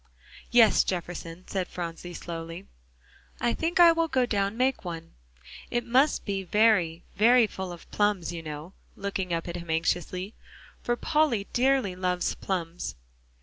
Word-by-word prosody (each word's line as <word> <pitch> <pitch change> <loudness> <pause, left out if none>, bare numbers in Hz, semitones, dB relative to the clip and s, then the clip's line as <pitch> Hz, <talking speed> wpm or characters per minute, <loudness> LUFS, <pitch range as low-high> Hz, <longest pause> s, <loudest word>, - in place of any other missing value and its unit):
"Yes, 235 -3 +6
Jefferson," 175 -1 -5
said 185 -2 -2
Phronsie 175 0 -6
slowly, 165 +2 -6 0.7
"I 235 - +1
think 340 +3 -1
I 340 -1 +9
will 330 0 +1
go 260 -5 +2
down 200 -2 -1
make 260 +1 +1
one. 165 -2 -6 0.6
It 240 -1 -1
must 260 +5 +3
be 195 -2 -1
very, 185 -4 +3
very 235 +3 +6
full 190 -3 -6
of 175 - -10
plums, 205 -5 +1
you 170 - -5
know," 155 +3 -7 0.2
looking 195 -2 -3
up 165 0 -1
at 170 0 -4
him 170 -1 -9
anxiously, 180 +4 -1 0.5
"for 240 - 0
Polly 265 -7 +1
dearly 255 -6 +2
loves 180 -1 0
plums." 175 - -4
190 Hz, 145 wpm, -27 LUFS, 170-240 Hz, 0.7 s, I